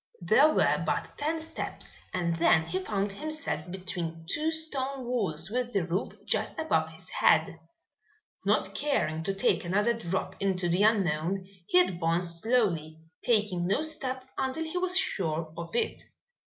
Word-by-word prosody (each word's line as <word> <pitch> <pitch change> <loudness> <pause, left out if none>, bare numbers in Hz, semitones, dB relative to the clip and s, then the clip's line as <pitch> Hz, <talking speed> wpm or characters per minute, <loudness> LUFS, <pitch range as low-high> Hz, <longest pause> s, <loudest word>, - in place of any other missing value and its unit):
There 240 - +5
were - - +3
but - - -1
ten 315 +3 -1
steps 320 - -4 0.2
and 170 -2 0
then 165 -1 +4
he 175 +3 -2
found 195 +1 -1
himself 310 - -4
between 175 -3 -5
two 305 - +2
stone 275 -5 -2
walls 195 -8 -2
with 245 0 -1
the 195 - +2
roof 180 +4 -2
just - - 0
above 320 0 +1
his - - -10
head. - - +3 0.8
Not - - +1
caring 170 - 0
to 195 - 0
take 195 - +2
another 205 +6 +2
drop 190 -5 -3
into 190 -2 0
the 175 +3 +2
unknown, 190 -3 +2 0.2
he 180 - +5
advanced 170 -1 +1
slowly, 180 -10 +1 0.3
taking 205 -7 +2
no 205 +11 +1
step 260 -5 -2
until 265 +4 -1
he 320 +2 -4
was 365 0 +2
sure 160 - -1
of 170 +3 -7
it. - - 0
195 Hz, 155 wpm, -29 LUFS, 170-260 Hz, 0.8 s, There